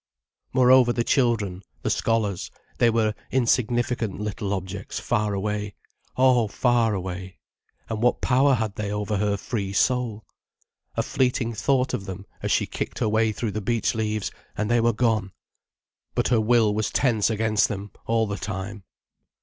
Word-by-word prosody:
Moreover 130 Hz, -1 st, +6 dB
the 120 Hz, 0 st, 0 dB
children, 115 Hz, -9 st, +1 dB, 0.2 s
the -, -, 0 dB
scholars, 110 Hz, -5 st, 0 dB, 0.3 s
they 120 Hz, -, +5 dB
were 110 Hz, -2 st, +1 dB, 0.2 s
insignificant 120 Hz, -3 st, +1 dB
little 105 Hz, -1 st, -3 dB
objects 95 Hz, 0 st, -4 dB
far 105 Hz, -3 st, 0 dB
away, 105 Hz, 0 st, -3 dB, 0.4 s
oh, 125 Hz, -3 st, +4 dB
far 115 Hz, 0 st, +2 dB
away. 95 Hz, 0 st, -5 dB, 0.5 s
And 110 Hz, -1 st, -3 dB
what 125 Hz, -, +3 dB
power 135 Hz, +2 st, +3 dB
had 110 Hz, -3 st, -3 dB
they 105 Hz, -1 st, -2 dB
over 105 Hz, 0 st, -1 dB
her 100 Hz, 0 st, +1 dB
free 100 Hz, -2 st, -3 dB
soul? 115 Hz, -1 st, +1 dB, 0.7 s
A -, -, +2 dB
fleeting 125 Hz, -2 st, 0 dB
thought 130 Hz, +4 st, +1 dB
of 100 Hz, -, -3 dB
them, 95 Hz, +1 st, -7 dB, 0.2 s
as -, -, -1 dB
she -, -, +2 dB
kicked -, -, -5 dB
her -, -, 0 dB
way 110 Hz, +1 st, +2 dB
through 110 Hz, 0 st, -3 dB
the 110 Hz, -, -3 dB
beech 115 Hz, +2 st, 0 dB
leaves, 110 Hz, -2 st, -2 dB, 0.3 s
and 110 Hz, +1 st, -1 dB
they 120 Hz, -1 st, +4 dB
were 120 Hz, +1 st, +3 dB
gone. 110 Hz, -4 st, 0 dB, 0.8 s
But -, -, +1 dB
her 120 Hz, -3 st, +3 dB
will 110 Hz, -1 st, +3 dB
was 110 Hz, 0 st, 0 dB
tense 115 Hz, -6 st, +2 dB
against 110 Hz, -1 st, +2 dB
them 100 Hz, -1 st, -6 dB, 0.2 s
all 115 Hz, 0 st, +2 dB
the 100 Hz, -1 st, -4 dB
time. 95 Hz, +2 st, -5 dB
110 Hz, 160 wpm, -25 LUFS, 100-120 Hz, 0.8 s, Moreover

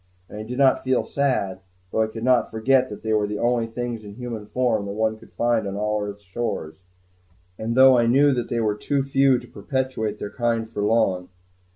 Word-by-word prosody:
And 105 Hz, -, -9 dB
I -, -, -4 dB
did 120 Hz, +3 st, -6 dB
not 135 Hz, -1 st, +4 dB
feel 130 Hz, -1 st, +1 dB
sad, 125 Hz, -10 st, -1 dB, 0.3 s
though 110 Hz, -, +1 dB
I 110 Hz, -, +2 dB
could 110 Hz, +1 st, -8 dB
not 125 Hz, -1 st, +3 dB
forget 130 Hz, +4 st, +2 dB
that 105 Hz, -, -9 dB
they 110 Hz, 0 st, 0 dB
were 105 Hz, -1 st, +2 dB
the 105 Hz, 0 st, -3 dB
only 120 Hz, 0 st, +1 dB
things 120 Hz, -1 st, -5 dB
in 100 Hz, -1 st, -10 dB
human 115 Hz, -3 st, -6 dB
form 110 Hz, -3 st, 0 dB
that 100 Hz, -, -4 dB
one 110 Hz, +1 st, -1 dB
could -, -, -17 dB
find 120 Hz, -3 st, 0 dB
on 100 Hz, -, -4 dB
all 105 Hz, +1 st, -1 dB
earth's 105 Hz, 0 st, -6 dB
shores, 95 Hz, -4 st, -4 dB, 0.8 s
and 115 Hz, +1 st, -2 dB
though 130 Hz, -1 st, +7 dB
I 115 Hz, -, +2 dB
knew 140 Hz, +4 st, +5 dB
that 120 Hz, -2 st, -2 dB
they 120 Hz, -, -1 dB
were 105 Hz, -2 st, +1 dB
too 135 Hz, +6 st, -1 dB
few 135 Hz, -1 st, +3 dB
to -, -, -9 dB
perpetuate 130 Hz, -6 st, -3 dB
their 105 Hz, -, -6 dB
kind 115 Hz, -2 st, -1 dB
for 110 Hz, -2 st, -5 dB
long. 100 Hz, -4 st, +1 dB
115 Hz, 220 wpm, -23 LUFS, 105-125 Hz, 0.8 s, though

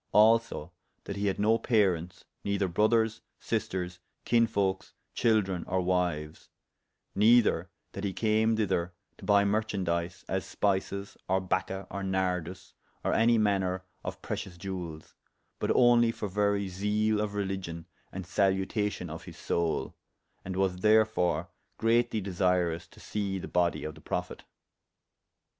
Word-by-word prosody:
Also 110 Hz, -6 st, +4 dB, 0.3 s
that 100 Hz, -, -5 dB
he 100 Hz, 0 st, -1 dB
had 95 Hz, -, 0 dB
no 110 Hz, +2 st, +3 dB
parents, 90 Hz, -6 st, +1 dB, 0.2 s
neyther 100 Hz, -1 st, 0 dB
brothers, 110 Hz, +4 st, +2 dB, 0.2 s
sisters, 90 Hz, -5 st, -3 dB, 0.3 s
kinsefolkes, 100 Hz, -5 st, +1 dB, 0.2 s
chyldren, 105 Hz, -6 st, +2 dB
or 95 Hz, -, 0 dB
wyues; 90 Hz, -4 st, -1 dB, 0.7 s
neyther 105 Hz, -5 st, +4 dB, 0.2 s
that 100 Hz, -, -6 dB
he 100 Hz, -, 0 dB
came 110 Hz, +2 st, +2 dB
thyther 90 Hz, -5 st, 0 dB, 0.3 s
to -, -, -10 dB
buy 100 Hz, -1 st, +5 dB
merchaundies, 95 Hz, -5 st, -1 dB
as -, -, -1 dB
spices, 100 Hz, 0 st, -1 dB
or 95 Hz, +1 st, +3 dB
bacca, 95 Hz, +1 st, -2 dB
or 100 Hz, -, -4 dB
nardus, 90 Hz, -1 st, -2 dB, 0.3 s
or -, -, +1 dB
any 115 Hz, +1 st, +4 dB
maner 95 Hz, -3 st, +1 dB, 0.2 s
of -, -, -6 dB
precious 90 Hz, -3 st, -5 dB
jewelles; 85 Hz, -4 st, -6 dB, 0.5 s
but -, -, -1 dB
only 120 Hz, -2 st, +5 dB
for 105 Hz, -, -4 dB
very 100 Hz, 0 st, +1 dB
zeale 105 Hz, +3 st, 0 dB
of 105 Hz, -1 st, -3 dB
religion 95 Hz, -5 st, -3 dB, 0.3 s
and 95 Hz, -1 st, -6 dB
saluation 95 Hz, +1 st, 0 dB
of 80 Hz, +1 st, -8 dB
his -, -, -10 dB
soule, 85 Hz, -2 st, -1 dB, 0.5 s
and 95 Hz, 0 st, -5 dB
was 95 Hz, -1 st, +1 dB
therefore 105 Hz, -4 st, +2 dB, 0.3 s
greatly 115 Hz, 0 st, +2 dB
desirous 90 Hz, -3 st, 0 dB
to -, -, -18 dB
see 100 Hz, -2 st, -3 dB
the 95 Hz, -, -6 dB
bodie 85 Hz, -1 st, +1 dB
of 75 Hz, -, -4 dB
the 75 Hz, -, -15 dB
prophet. -, -, -4 dB
95 Hz, 135 wpm, -29 LUFS, 90-105 Hz, 0.7 s, buy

